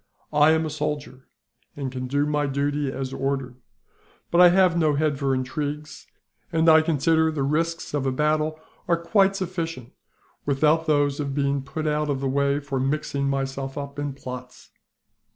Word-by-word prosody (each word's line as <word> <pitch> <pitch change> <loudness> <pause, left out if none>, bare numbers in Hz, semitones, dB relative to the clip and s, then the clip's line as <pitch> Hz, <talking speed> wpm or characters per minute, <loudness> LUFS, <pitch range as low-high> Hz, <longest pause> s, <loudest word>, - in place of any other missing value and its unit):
"I 150 +1 +5
am 160 0 +3
a 155 - -4
soldier, 145 -3 -4 0.5
and 135 -3 -4
can 130 0 -4
do 145 +3 +1
my 150 -1 0
duty 140 0 -1
as 135 -1 -5
ordered, 135 -2 -2 0.7
but 170 - +5
I 180 - +9
have 185 -1 +4
no 155 -3 +2
head 145 -1 0
for 135 -2 +1
intrigues; 150 +3 -4 0.4
and 165 -1 +2
I 160 0 +8
consider 160 0 +2
the 145 -3 -2
risks 165 +4 -1
of 140 -2 0
a - - +1
battle 155 +3 0 0.3
are 170 -1 +3
quite 195 +3 +2
sufficient, 165 -9 -4 0.5
without 155 +3 +2
those 145 -2 +2
of 140 -2 -3
being 140 -1 0
put 140 +3 -5
out 150 0 0
of 140 -2 0
the 135 - -1
way 140 +1 +1
for 140 -2 -3
mixing 140 0 -1
myself 135 0 -3
up 140 0 -6
in 145 -1 -3
plots. 125 -1 -9
145 Hz, 170 wpm, -24 LUFS, 135-155 Hz, 0.7 s, I